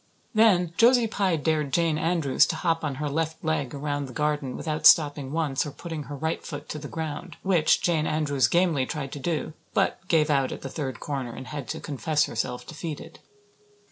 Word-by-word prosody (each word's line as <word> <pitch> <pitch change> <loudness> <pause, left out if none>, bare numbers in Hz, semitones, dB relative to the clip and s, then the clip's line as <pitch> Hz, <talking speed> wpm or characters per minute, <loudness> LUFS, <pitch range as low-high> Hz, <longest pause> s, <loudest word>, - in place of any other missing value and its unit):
Then 190 -6 +4
Josie 240 0 +6
Pye 200 -5 +1
dared 155 -2 0
Jane 165 +1 +2
Andrews 160 -5 +3
to - - -2
hop 165 -2 0
on 145 -3 -2
her 150 +2 -3
left 160 +2 -2
leg 145 -5 -1
around 145 0 -2
the 125 - -10
garden 150 -3 -1
without 155 -2 +3
stopping 145 -3 +5
once 150 -4 0
or 150 - -5
putting 160 0 -7
her 145 +2 -7
right 160 +3 -2
foot 145 -1 -7
to 150 - -4
the 145 - -7
ground; 160 -1 -5
which 180 -5 +3
Jane 160 -3 +1
Andrews 145 -5 +2
gamely 170 -6 +2
tried 140 -4 -4
to 145 - -6
do, 155 +2 -2 0.2
but - - +2
gave 155 -3 +3
out 135 -2 +2
at - - -6
the 135 - -4
third 130 -5 -4
corner 135 -5 -4
and 130 - -8
had 145 -5 -5
to - - -4
confess 150 +2 0
herself 125 -3 -3
defeated. 155 -1 -7
150 Hz, 200 wpm, -26 LUFS, 140-165 Hz, 0.2 s, Josie